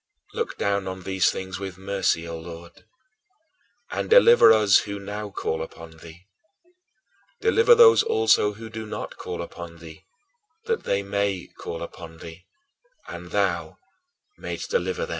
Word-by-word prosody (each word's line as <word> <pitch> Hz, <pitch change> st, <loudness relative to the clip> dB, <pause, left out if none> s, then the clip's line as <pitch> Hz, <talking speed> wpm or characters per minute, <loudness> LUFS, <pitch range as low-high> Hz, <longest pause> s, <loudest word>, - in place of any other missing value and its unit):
Look -, -, -3 dB
down 100 Hz, -1 st, -1 dB
on 95 Hz, 0 st, -6 dB
these 95 Hz, 0 st, +2 dB
things 95 Hz, 0 st, -5 dB
with 95 Hz, -2 st, -6 dB
mercy, 95 Hz, -4 st, -1 dB
O 85 Hz, -1 st, -6 dB
Lord, 85 Hz, +1 st, -12 dB, 1.1 s
and -, -, -3 dB
deliver 475 Hz, -, +7 dB
us 105 Hz, -3 st, +5 dB
who 100 Hz, -1 st, -6 dB
now 105 Hz, +1 st, -6 dB
call 80 Hz, -4 st, -3 dB
upon 80 Hz, 0 st, -10 dB
thee; 85 Hz, +3 st, -14 dB, 1.1 s
deliver 455 Hz, +2 st, +5 dB
those 465 Hz, -1 st, +7 dB
also 435 Hz, -, +2 dB
who 110 Hz, +2 st, -10 dB
do 110 Hz, 0 st, -7 dB
not -, -, -6 dB
call 90 Hz, -1 st, -5 dB
upon 85 Hz, 0 st, -10 dB
thee, 80 Hz, -1 st, -13 dB, 0.6 s
that 460 Hz, -1 st, -2 dB
they 100 Hz, 0 st, 0 dB
may 100 Hz, -2 st, -2 dB
call 85 Hz, -, -6 dB
upon 85 Hz, -1 st, -10 dB
thee, 85 Hz, +2 st, -12 dB, 0.6 s
and -, -, -8 dB
thou -, -, -1 dB, 0.6 s
mayest -, -, -6 dB
de 485 Hz, 0 st, -1 dB
95 Hz, 140 wpm, -24 LUFS, 85-110 Hz, 1.1 s, deliver